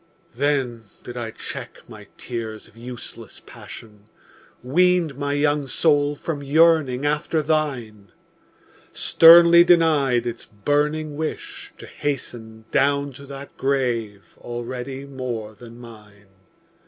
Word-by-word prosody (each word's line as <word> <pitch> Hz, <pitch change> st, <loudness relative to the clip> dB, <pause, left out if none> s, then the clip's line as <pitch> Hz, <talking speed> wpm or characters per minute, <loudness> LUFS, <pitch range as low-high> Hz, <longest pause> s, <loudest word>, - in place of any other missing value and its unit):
Then 130 Hz, -4 st, -1 dB, 0.2 s
did 120 Hz, -, -9 dB
I 120 Hz, -2 st, -4 dB
check -, -, -8 dB
my -, -, -13 dB
tears 115 Hz, -3 st, -6 dB
of -, -, -23 dB
useless 120 Hz, +1 st, -9 dB
passion, 105 Hz, -2 st, -12 dB, 0.6 s
Weaned 175 Hz, +2 st, +2 dB
my 145 Hz, +1 st, -2 dB
young 145 Hz, -1 st, +1 dB
soul 145 Hz, +1 st, +2 dB
from 145 Hz, 0 st, -5 dB
yearning 145 Hz, -2 st, +3 dB
after 150 Hz, +1 st, 0 dB
thine, 125 Hz, -, -2 dB, 0.8 s
Sternly 170 Hz, +1 st, +7 dB
denied 150 Hz, -8 st, +3 dB
its 120 Hz, -1 st, -5 dB
burning 145 Hz, +7 st, -1 dB
wish 155 Hz, 0 st, -5 dB
to -, -, -11 dB
hasten 115 Hz, -6 st, -5 dB
Down 140 Hz, 0 st, +1 dB
to 140 Hz, +2 st, -12 dB
that 140 Hz, 0 st, -10 dB
grave 120 Hz, -7 st, -2 dB
already 125 Hz, +3 st, -6 dB
more 125 Hz, -6 st, -6 dB
than 115 Hz, +2 st, -13 dB
mine! 105 Hz, -4 st, -15 dB
135 Hz, 115 wpm, -22 LUFS, 115-150 Hz, 0.8 s, Sternly